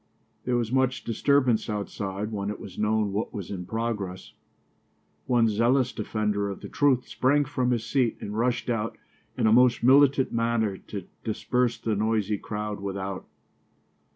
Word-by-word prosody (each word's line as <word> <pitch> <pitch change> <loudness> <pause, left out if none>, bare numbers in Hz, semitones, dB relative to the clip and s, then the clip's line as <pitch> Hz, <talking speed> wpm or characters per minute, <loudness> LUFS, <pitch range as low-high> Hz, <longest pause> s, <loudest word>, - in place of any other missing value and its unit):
There 125 - +1
was 115 -1 -1
much 130 0 +1
disturbance 120 -1 +2
outside 100 0 -3
when 100 -1 -3
it 105 - -5
was 95 - -9
known 105 -1 +1
what 105 +3 -3
was 100 -2 -6
in 90 -3 -5
progress. 110 -5 -4 0.9
One 120 -3 +4
zealous 120 +4 +2
defender 105 -1 -1
of 100 - -7
the - - -8
truth 135 -4 +2
sprang 145 +3 +2
from 130 -3 -1
his 120 -3 0
seat 125 -3 +1
and 105 - -6
rushed 120 +2 0
out 115 -2 -2 0.4
in - - +1
a 110 - +5
most 125 0 +4
militant 135 +1 +5
manner 115 -3 0
to 100 -2 -8 0.2
disperse 120 +2 0
the 110 -2 -1
noisy 105 -1 0
crowd 105 -1 -4
without. 100 -1 -5
110 Hz, 155 wpm, -26 LUFS, 105-125 Hz, 0.9 s, a